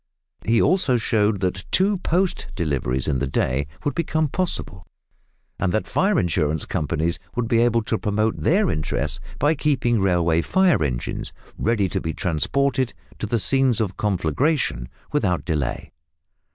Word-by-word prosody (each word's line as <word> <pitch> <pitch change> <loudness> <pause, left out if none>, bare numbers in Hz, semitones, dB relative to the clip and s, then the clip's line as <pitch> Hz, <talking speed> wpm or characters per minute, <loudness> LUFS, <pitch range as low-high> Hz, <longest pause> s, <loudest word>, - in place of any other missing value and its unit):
He 115 +1 +3
also 150 -8 +3
showed 105 -3 +1
that 95 0 -1
two 195 +1 +2
post 180 +1 0
deliveries 70 -7 -1
in 70 -4 +1
the 70 - -1
day 65 +1 0 0.2
would 145 - +1
become 160 -2 0
possible, 145 - -3 0.8
and 90 - +1
that 110 - 0
fire 195 -1 +2
insurance 80 -2 0
companies 80 +2 -1 0.2
would 120 -1 -1
be 115 -1 +3
able 115 -1 +2
to 110 0 -1
promote 105 +1 0
their 190 +2 +2
interests 75 0 -2 0.2
by 145 +3 +3
keeping 125 -7 +1
railway 85 -3 +2
fire 185 - +3
engines, 60 -4 -3 0.2
ready 110 -3 +1
to - - -2
be 80 -2 -3
transported 130 - 0 0.2
to 110 +2 0
scenes 130 +1 +2
of 105 -4 -1
conflagration 95 - 0 0.2
without 95 - 0
delay. 75 -7 -2
105 Hz, 145 wpm, -23 LUFS, -, 0.8 s, He